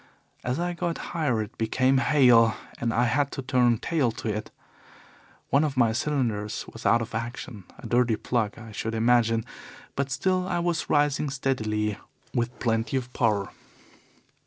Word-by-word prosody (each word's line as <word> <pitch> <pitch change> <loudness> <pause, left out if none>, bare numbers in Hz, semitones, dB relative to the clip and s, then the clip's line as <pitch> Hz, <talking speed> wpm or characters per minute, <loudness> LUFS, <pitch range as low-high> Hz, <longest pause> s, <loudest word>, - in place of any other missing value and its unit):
As 125 +5 -1
I 175 0 -1
got 170 -1 -2 0.2
higher 135 -10 +1
it 105 - -13
became 130 +4 +2
hail, 125 -6 +5 0.2
and 120 -1 0
I 120 +2 +2
had 140 +4 +1
to 135 - -4
turn 125 -2 +3
tail 145 -2 0
to 115 - -4
it. 105 0 -3 1.0
One 140 +2 +4
of 145 -3 -2
my 120 -3 +4
cylinders 115 -5 -1
was 115 - -3
out 115 0 +4
of 115 - -10
action 115 -3 -5
a - - -12
dirty 120 -2 +2
plug, 110 -2 -1
I 110 -1 -10
should 110 +2 -3
imagine, 115 -1 +3 0.5
but 140 0 -1
still 185 +7 0
I - - -1
was 170 -1 -1
rising 145 0 +2
steadily 110 -6 -1 0.3
with 120 0 -1
plenty 115 +2 0
of 125 -1 -5
power. 105 -5 +1
120 Hz, 160 wpm, -26 LUFS, 115-140 Hz, 1.0 s, hail